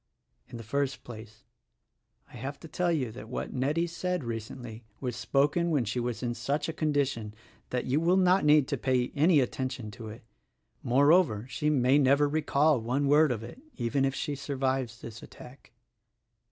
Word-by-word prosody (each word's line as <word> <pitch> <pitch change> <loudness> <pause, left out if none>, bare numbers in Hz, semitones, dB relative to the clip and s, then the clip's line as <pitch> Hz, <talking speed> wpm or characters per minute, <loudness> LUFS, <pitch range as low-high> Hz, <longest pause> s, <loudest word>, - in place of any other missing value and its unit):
In 120 - -9
the 115 - -8
first 135 +3 -2
place, 110 -2 -11 0.9
I - - -15
have 135 +4 -6
to 165 - -9
tell 175 +2 0
you 135 -8 -1
that 110 -1 -10
what 125 - -4
Nettie 145 +6 0
said 180 0 -3
recently 115 0 -6 0.2
was 125 -3 -3
spoken 145 +7 +1
when 145 -7 +1
she 115 +4 -2
was 120 0 -3
in 120 -1 -1
such 140 +5 -2
a 160 - -3
condition 140 -9 -1 0.3
that 125 -1 -2
you 135 +4 +1
will 175 +3 +3
not 185 +1 +4
need 150 -2 +5
to - - -1
pay 125 -2 0
any 155 +1 +4
attention 125 -3 -3
to 115 0 -9
it. 110 +1 -10 0.6
Moreover, 135 - +3
she 150 +3 -1
may 135 -1 +3
never 140 +1 +4
recall 150 -2 +2
one 130 +5 0
word 150 0 +5
of 110 -2 -3
it 120 - -10
— - - -32
even 130 +4 0
if 135 0 0
she 145 - -3
survives 130 -4 -2
this 115 -1 -9
attack." 125 +2 -14
135 Hz, 180 wpm, -29 LUFS, 120-150 Hz, 0.9 s, need